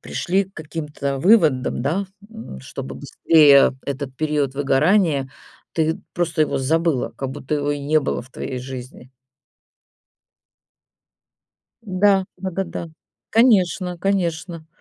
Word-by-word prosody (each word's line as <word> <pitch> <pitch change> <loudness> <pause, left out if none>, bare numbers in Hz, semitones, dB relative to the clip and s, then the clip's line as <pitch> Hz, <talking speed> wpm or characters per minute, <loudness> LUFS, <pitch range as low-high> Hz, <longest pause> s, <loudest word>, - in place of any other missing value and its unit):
пришли 190 +3 -1
к 195 - -25
каким-то 150 -3 -4
выводам, 155 - +3
да, 170 +9 0 0.3
м, 220 - -9
чтобы 65 +1 -7
быстрее 145 -5 +5
этот 140 -1 -5
период 150 -3 -1
выгорания, 145 +1 +2 0.4
ты 160 0 0
просто 165 -3 0
его 150 - -1
забыла, 160 0 0
как 135 -1 -4
будто 145 +1 -4
его 145 0 -1
и 145 - -1
не 155 +2 +2
было 140 - -2
в 130 - -18
твоей 130 0 -5
жизни. 125 0 -9 2.8
М-да, 195 0 +3
дага 190 0 -3
да. 170 -1 -6 0.4
Конечно-конечно. 180 -6 +1
155 Hz, 115 wpm, -21 LUFS, 140-180 Hz, 2.8 s, быстрее